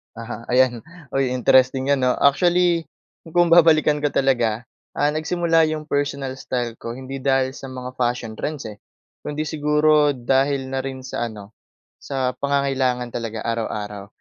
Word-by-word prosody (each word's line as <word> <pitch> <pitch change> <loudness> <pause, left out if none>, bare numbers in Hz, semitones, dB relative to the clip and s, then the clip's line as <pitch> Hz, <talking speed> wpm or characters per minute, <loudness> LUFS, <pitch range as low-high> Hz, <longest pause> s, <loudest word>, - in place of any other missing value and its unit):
Aha, 115 0 -8
ayan. 125 -1 +3 0.3
Uy, 135 -1 +1
interesting 130 +2 +3
yan 140 - +3
'no. 125 -1 +2
Actually, 175 +2 +3 0.5
kung 175 -1 +4
babalikan 155 -3 +5
ko 145 - +1
talaga, 120 -5 +1 0.3
ah, 145 +1 +2
nagsimula 165 +1 +1
yung 155 0 -3
personal 140 -3 -2
style 120 -4 -3
ko 115 +1 -6
hindi 130 +1 -7
dahil 135 -1 +1
sa 135 - -9
mga 130 -1 -7
fashion 120 -2 -1
trends, 150 -2 -4
eh. 105 -2 -9 0.4
Kung 150 - -6
hindi 155 - -1
siguro 150 -1 +2
dahil 135 +2 0
na 135 - -1
rin 130 0 -5
sa 120 -2 -3
ano, 105 -2 -11 0.5
sa 130 -2 -2
pangangailangan 130 -3 -1
talaga 115 -2 -5
araw-araw. 105 -3 -4
135 Hz, 150 wpm, -22 LUFS, 125-150 Hz, 0.5 s, babalikan